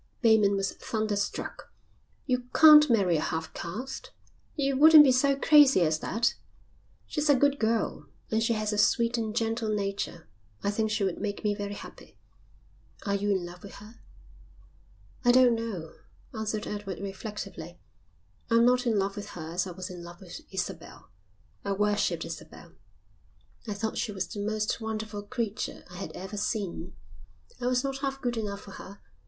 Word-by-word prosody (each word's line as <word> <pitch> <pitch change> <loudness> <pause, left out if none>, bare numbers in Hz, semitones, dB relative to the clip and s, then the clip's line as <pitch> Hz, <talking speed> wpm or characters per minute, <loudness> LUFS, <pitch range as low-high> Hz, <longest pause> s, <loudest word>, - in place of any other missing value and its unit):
Bateman 215 -3 +5
was 195 -1 -1
thunderstruck. 215 -2 -3 0.5
"You 250 -2 -1
can't 300 -1 +9
marry 195 -8 +3
a - - -1
half 160 0 -3
caste. 255 - -6 0.5
You 275 -2 0
wouldn't 310 +2 +9
be 270 - +5
so 275 +2 +3
crazy 275 - +6
as 155 -2 +2
that." 230 +7 0 0.7
"She's 300 -1 -2
a 285 - +7
good 285 +1 +2
girl, 225 0 -1 0.2
and 220 0 +2
she 230 +1 +2
has 215 -1 -1
a 210 - 0
sweet 235 +2 +3
and 220 -1 -3
gentle 225 -1 -1
nature. 200 -5 -3 0.4
I 200 - +1
think 220 +1 0
she 215 -1 0
would 190 -2 -2
make 205 -1 -3
me 210 -1 +2
very 205 0 -5
happy." - - -12 0.9
"Are 200 - 0
you 200 +1 0
in 190 -3 +1
love 175 +1 -10
with 200 - -11
her?" 210 +3 -14 1.2
"I 245 - +6
don't 250 -1 +6
know," 220 -8 -4 0.4
answered 215 -1 -3
Edward 205 -3 -5
reflectively. 200 +2 -7 0.7
"I'm 230 0 +5
not 250 0 +3
in 225 -3 +2
love 195 0 0
with 205 - -6
her 160 -1 -6
as 180 +2 -1
I - - -6
was 185 +2 -7
in 175 -1 -8
love 175 0 -11
with 180 -2 -10
Isabel. 190 -2 -6 0.5
I 200 - -1
worshipped 210 +1 0
Isabel. - - -10 0.9
I 210 - -3
thought 220 +2 -3
she 220 - -2
was 190 -2 -3
the 210 - -7
most 215 +1 -1
wonderful 220 -1 -4
creature 220 -1 -4
I 180 - -9
had 195 - -6
ever 190 +3 -7
seen. 205 -3 -3 0.6
I 245 - -2
was 250 0 +2
not 270 -1 -3
half 270 -1 -3
good 245 -2 -2
enough 205 -3 -4
for 195 - -12
her. 200 +1 -11
215 Hz, 170 wpm, -28 LUFS, 200-240 Hz, 1.2 s, can't